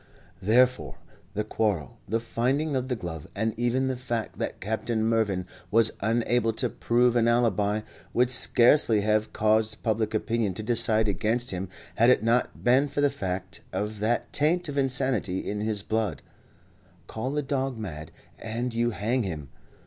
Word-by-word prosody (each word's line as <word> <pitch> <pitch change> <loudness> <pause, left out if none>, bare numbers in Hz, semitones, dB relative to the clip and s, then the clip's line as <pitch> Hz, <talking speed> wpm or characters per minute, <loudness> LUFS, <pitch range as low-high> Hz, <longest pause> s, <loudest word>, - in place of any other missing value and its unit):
Therefore, 110 - +2 0.4
the 105 - 0
quarrel, 105 - -2
the 115 +2 +1
finding 130 +6 -1
of 130 -1 -1
the 125 - -1
glove, 80 -7 -7
and 110 +2 0
even 120 +3 0
the 130 - -1
fact 120 -3 -4
that - - -3
Captain 110 +2 -2
Mervyn 110 -5 +1 0.2
was 110 +1 +4
unable 115 +1 +1
to 125 +2 -1
prove 120 +1 +2
an 115 -1 +3
alibi, 110 -3 +2 0.3
would 125 +1 +2
scarcely 120 -2 +4
have 110 +1 +1
caused 110 0 +1
public 110 -1 0
opinion 110 -3 0
to 110 - -5
decide 110 -1 +2
against 110 +5 0
him 95 0 -4 0.3
had 115 +2 +5
it 125 - +4
not 120 +2 0
been 130 +4 +4
for 145 +1 -2
the 145 -1 +3
fact 95 -7 -5
of 105 0 -3
that 110 +3 -1
taint 170 +4 +2
of 145 - -5
insanity 130 -8 +1
in 105 0 -2
his 105 -2 -1
blood. 110 -7 -2 0.8
Call 130 +10 -4
a 150 - 0
dog 135 -2 -2
mad 85 -7 -6 0.3
and 115 +2 -3
you 120 +1 +1
hang 115 +3 -1
him. 80 - -5
115 Hz, 165 wpm, -27 LUFS, 105-125 Hz, 0.8 s, had